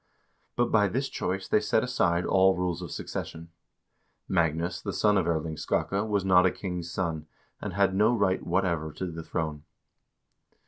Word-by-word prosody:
But 120 0 +1
by 105 -2 +4
this 130 +8 -2
choice 95 +2 -3
they - - +3
set - - +1
aside 85 0 +1
all 95 0 +4
rules 90 -1 -1
of 90 - -6
succession. 80 +3 -6 0.8
Magnus, 85 0 0
the 100 - -4
son 105 -1 +3
of - - +2
Erling 80 -1 -1
Skakke, 100 +7 -1
was 100 -2 0
not 90 -1 +6
a - - +1
king's 90 -3 -5
son, 80 -4 -3 0.3
and - - -4
had 100 0 +2
no 105 +4 +4
right 100 -5 +1
whatever 85 -3 0
to 95 - -4
the 80 0 -6
throne. 80 -2 -3
90 Hz, 170 wpm, -28 LUFS, 85-95 Hz, 0.8 s, not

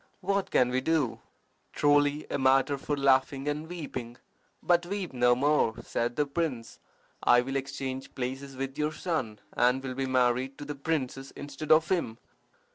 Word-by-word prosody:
What 195 +1 0
can 125 - +3
we 130 +1 0
do?" 145 -4 0 0.5
"Truly 145 0 +3
a - - -1
matter 135 +1 +4
for 145 +1 -2
laughing 135 0 +2
and 150 +2 -2
weeping. 130 -8 -6 0.5
But 175 0 +3
weep 195 -4 -4
no 125 -1 +4
more," 140 -4 +2
said 120 +1 -2
the 150 - +2
prince. 140 -6 -3 0.4
"I 120 - +5
will 135 +2 -4
exchange 135 -1 -4
places 135 +2 -4
with 135 +2 -4
your 150 +1 0
son, 150 -10 -2 0.2
and 125 +2 +2
will 130 -1 -4
be 135 +1 -2
married 130 +1 +1
to 145 - -7
the 145 - -4
princess 135 -2 -3
instead 145 +1 -5
of 155 0 +5
him. 165 -12 0
135 Hz, 165 wpm, -29 LUFS, 130-150 Hz, 0.5 s, I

